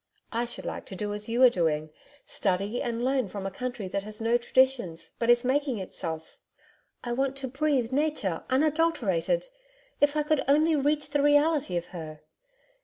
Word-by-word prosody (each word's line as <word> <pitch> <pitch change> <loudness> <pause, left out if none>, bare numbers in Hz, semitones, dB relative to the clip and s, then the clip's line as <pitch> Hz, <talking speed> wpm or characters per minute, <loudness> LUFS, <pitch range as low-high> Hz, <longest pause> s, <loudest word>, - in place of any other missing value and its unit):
I 235 +1 0
should 240 - -6
like - - -5
to 190 - -7
do 205 +2 -3
as 210 +2 -4
you 240 +3 +3
are 255 - +10
doing, 155 -5 0 0.3
study 200 +4 -1
and 235 0 -2
learn 260 -3 +1
from 195 0 -6
a 195 - -2
country 245 -1 -4
that 200 - -2
has 215 +1 -7
no 230 +1 +2
traditions, 240 -9 +1
but 230 - 0
is 240 +1 +5
making 270 -1 +1
itself. 160 -4 -6 0.6
I 240 - -2
want 270 +2 0
to 275 -1 -4
breathe 270 -2 0
Nature 275 - 0
unadulterated 305 - +1 0.5
if 290 +1 +3
I 300 - +2
could 300 -1 +1
only 310 +3 +4
reach 295 +1 0
the 290 0 +2
reality 290 - +3
of 170 - -3
her. 155 -3 -7
240 Hz, 180 wpm, -28 LUFS, 195-285 Hz, 0.6 s, are